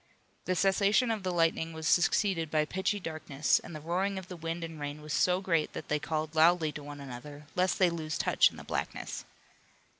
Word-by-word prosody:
The 185 Hz, -, 0 dB
cessation 200 Hz, +6 st, +3 dB
of 220 Hz, -2 st, -2 dB
the 185 Hz, -1 st, -2 dB
lightning 165 Hz, -1 st, +1 dB
was 160 Hz, 0 st, -4 dB
succeeded 175 Hz, -1 st, +2 dB
by 155 Hz, 0 st, +2 dB
pitchy 190 Hz, +5 st, -1 dB
darkness, 155 Hz, -4 st, 0 dB
and 170 Hz, -, -10 dB
the -, -, -5 dB
roaring 185 Hz, +5 st, -1 dB
of 185 Hz, -1 st, -7 dB
the 180 Hz, -, -6 dB
wind 165 Hz, 0 st, -4 dB
and 165 Hz, -1 st, -7 dB
rain 145 Hz, +1 st, -5 dB
was 150 Hz, 0 st, -5 dB
so 180 Hz, +3 st, +3 dB
great 165 Hz, -5 st, 0 dB
that -, -, -7 dB
they 150 Hz, -, +1 dB
called 155 Hz, 0 st, -3 dB
loudly 160 Hz, 0 st, +4 dB
to 150 Hz, -, -8 dB
one 145 Hz, 0 st, -8 dB
another 140 Hz, +2 st, -9 dB
lest 185 Hz, +1 st, +2 dB
they 180 Hz, -3 st, +4 dB
lose 155 Hz, -3 st, -3 dB
touch -, -, +4 dB
in -, -, -14 dB
the -, -, -9 dB
blackness. -, -, -4 dB
165 Hz, 210 wpm, -30 LUFS, 155-185 Hz, -, loudly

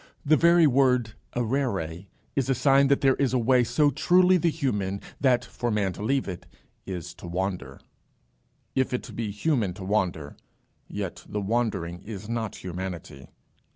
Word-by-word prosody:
The 155 Hz, +2 st, +5 dB
very 170 Hz, +1 st, +5 dB
word 125 Hz, -5 st, +3 dB, 0.2 s
errare 110 Hz, -, -1 dB, 0.3 s
is 135 Hz, -1 st, 0 dB
a 135 Hz, -, +3 dB
sign 135 Hz, +2 st, +4 dB
that 140 Hz, 0 st, +2 dB
there 135 Hz, -1 st, +5 dB
is 135 Hz, -3 st, +1 dB
a -, -, +4 dB
way 125 Hz, +1 st, +4 dB
so 145 Hz, +5 st, +2 dB
truly 180 Hz, +6 st, +4 dB
the 170 Hz, 0 st, +2 dB
human 105 Hz, -, -1 dB, 0.2 s
that, 125 Hz, -3 st, +3 dB
for 120 Hz, -, -3 dB
a -, -, -1 dB
man 100 Hz, -3 st, 0 dB
to 95 Hz, -, -9 dB
leave 135 Hz, +5 st, 0 dB
it, 90 Hz, -3 st, -7 dB, 0.4 s
is 90 Hz, -2 st, -5 dB
to -, -, -11 dB
wander. 90 Hz, -6 st, -3 dB, 0.9 s
If 130 Hz, -1 st, +1 dB
it -, -, -6 dB
be 115 Hz, -2 st, -2 dB
human 105 Hz, -, 0 dB
to 100 Hz, -, -8 dB
wander, 90 Hz, -8 st, -1 dB, 0.5 s
yet -, -, -5 dB
the 105 Hz, -, -2 dB
wandering 100 Hz, -5 st, -1 dB
is 105 Hz, -1 st, -8 dB
not 115 Hz, -3 st, -3 dB
humanity. 90 Hz, -6 st, -7 dB
115 Hz, 165 wpm, -26 LUFS, 95-135 Hz, 0.9 s, The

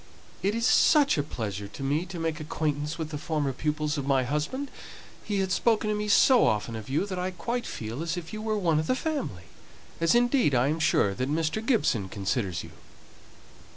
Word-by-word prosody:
"It 200 Hz, +3 st, 0 dB
is 230 Hz, 0 st, 0 dB
such 290 Hz, +2 st, +5 dB
a 150 Hz, -, +1 dB
pleasure 105 Hz, -8 st, -5 dB
to 135 Hz, -, -9 dB
me 150 Hz, +6 st, 0 dB
to 180 Hz, -1 st, -7 dB
make 165 Hz, 0 st, -2 dB
acquaintance 150 Hz, -1 st, -2 dB
with 160 Hz, -2 st, -4 dB
the 150 Hz, -, -4 dB
former 150 Hz, -4 st, -1 dB
pupils 150 Hz, +2 st, -1 dB
of 135 Hz, -, -4 dB
my 135 Hz, -2 st, +3 dB
husband. 150 Hz, -, -2 dB, 0.5 s
He 205 Hz, -, -2 dB
has 190 Hz, -1 st, 0 dB
spoken 215 Hz, 0 st, +2 dB
to -, -, 0 dB
me 210 Hz, 0 st, -2 dB
so 250 Hz, +4 st, +5 dB
often 110 Hz, +2 st, 0 dB
of 110 Hz, +1 st, -7 dB
you 150 Hz, +8 st, +1 dB
that 185 Hz, -3 st, -4 dB
I 180 Hz, +1 st, -1 dB
quite 235 Hz, +7 st, -3 dB
feel 115 Hz, +5 st, -5 dB
as 170 Hz, +2 st, -2 dB
if 175 Hz, +2 st, -7 dB
you 215 Hz, -, -4 dB
were 215 Hz, -1 st, -1 dB
one 165 Hz, -6 st, +2 dB
of 155 Hz, -, -2 dB
the -, -, +2 dB
family, 270 Hz, -, -3 dB, 0.6 s
as 165 Hz, +6 st, +3 dB
indeed 240 Hz, -, +3 dB
I 125 Hz, +3 st, +3 dB
am 155 Hz, +2 st, -1 dB
sure 100 Hz, -10 st, +3 dB
that 130 Hz, +6 st, -2 dB
Mr. 160 Hz, +7 st, -1 dB
Gibson 130 Hz, -, +1 dB
considers 95 Hz, -, -2 dB
you." -, -, -11 dB
155 Hz, 210 wpm, -27 LUFS, 135-210 Hz, 0.6 s, such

